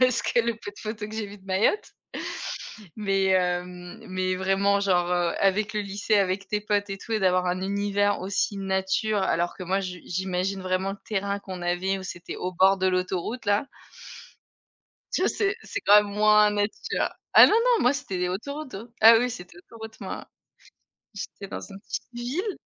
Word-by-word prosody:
parce 255 -3 +4
que 240 - +2
le 235 0 -1
peu 220 - -8
de 205 - -18
photos 215 -1 -5
que 215 - -8
j'ai 220 -2 -2
vu 205 +1 -11
de 190 - -23
Mayotte 195 - +1 1.0
Mais 195 -2 +1
hem, 180 +2 -1
mais 185 -1 -1
vraiment 195 +2 +2
genre, 180 -3 +2
heu, 175 -1 +1
avec 200 +2 +2
le 210 - -1
lycée 205 +2 0
avec 195 0 +1
tes 210 +1 0
potes 205 -1 -1
et 195 - -4
tout 225 - -7
et 220 - +1
d'avoir 185 -1 +2
un 180 +1 -1
univers 205 +1 0
aussi 195 +2 -1
nature 195 +2 0
alors 175 -1 0
que - - -7
moi 190 +2 0
je 185 -2 -5
j'imagine 190 +1 -2
vraiment 185 +1 -1
le 200 - -7
terrain 200 -1 -1
qu'on 185 -3 -8
avait 180 +2 0
où 190 - -7
c'était 175 -2 -7
au 180 - -3
bord 190 +2 +5
de 190 0 0
l'autoroute 185 +5 -2
là 205 +6 +2 1.5
tu - - +1
vois - - +3
c'est 400 -1 0
c'est 405 - -5
quand 205 +1 +7
même 205 -1 -7
moins 210 0 +5
nature 210 - -1 0.3
ah - - +11
non, - - +2
non 465 +1 +4
moi 250 - +4
c'était 255 -9 -4
les 180 0 0
autoroutes 280 +8 -5 0.2
ah 225 +1 +9
oui 245 +2 +1
c'était 180 -5 -9
l'autoroute 220 +4 -11
moi - - -6 0.9
j'étais 200 0 -7
dans - - -6
une 195 -1 -10
petite - - -5
ville 295 - -3
200 Hz, 195 wpm, -26 LUFS, 185-215 Hz, 1.5 s, ah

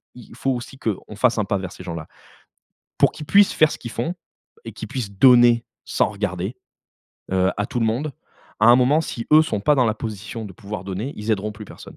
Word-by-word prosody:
il 120 -2 -13
faut 135 - -2
aussi 125 +1 -5
qu'on 105 -2 -4
fasse 120 +2 +2
un 105 - +1
pas 100 -2 -1
vers 95 0 -6
ces 90 - -11
gens-là. 85 -3 -6 0.9
Pour - - +5
qu'ils 150 - -9
puissent 200 +4 +5
faire 155 -1 +4
ce - - -7
qu'ils 120 - -8
font 120 +10 -3 0.5
et - - -6
qu'ils - - -8
puissent 120 -7 -4
donner, 120 +2 +6 0.2
sans - - +1
regarder, 100 +2 -3 0.8
heu, 95 0 +3
à 105 - -1
tout 120 - -3
le 115 - +2
monde. 135 +7 -1 0.5
À 110 - +5
un 120 - +8
moment 130 +5 +3
si 120 -7 -5
eux 155 - +8
sont 110 -10 -2
pas 150 +8 +3
dans 130 -3 +3
la 110 - +1
position 110 0 -6
de 100 - -9
pouvoir 100 -1 -7
donner, 100 +9 -4
ils 105 +1 -4
aideront 105 +1 -2
plus 105 +1 -10
personne. - - -13
115 Hz, 225 wpm, -22 LUFS, 100-125 Hz, 0.9 s, un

